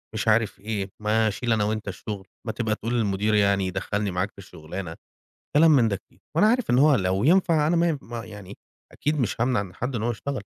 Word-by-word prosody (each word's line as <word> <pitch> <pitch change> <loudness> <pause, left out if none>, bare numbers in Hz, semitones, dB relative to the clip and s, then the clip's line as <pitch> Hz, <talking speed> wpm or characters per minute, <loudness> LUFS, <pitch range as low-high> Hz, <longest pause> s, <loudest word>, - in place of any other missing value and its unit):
مش 110 - -2
عارف 110 -1 +2
إيه، 100 -1 -3
"ما 110 +1 +2
اشيل 115 +3 -1
أنا 110 -2 +1
وأنت 110 0 -2
الشغل، 100 0 -6 0.2
ما - - 0
تبقى 110 -2 -1
تقول 115 +2 -4
للمدير 105 -2 +1
يعني 100 -2 +3
يدخلّني 105 +2 -2
معاك 90 +3 -1
في - - -62
الشُغلانة"، 85 -2 -8 0.6
كلام 160 +2 +7
من 130 -7 +5
ده 100 - -1
كتير، 95 - -22 0.2
وأنا 190 - +5
عارف 245 +1 +1
إن 120 - +4
هو 145 +1 +6
لو 95 -1 0
ينفع 165 -2 +4
أنا 170 +3 +2
ما 170 +1 +3
ي 155 -3 -1
ما 115 -1 -7
يعني 105 -2 -10 0.4
أكيد 150 0 -1
مش 115 -2 -1
هامنع 125 -1 +2
إن 95 -2 -7
حد 125 +3 -3
إن 110 - -3
هو 120 - 0
يشتغل، 130 +1 -4
110 Hz, 225 wpm, -25 LUFS, 100-125 Hz, 0.6 s, كلام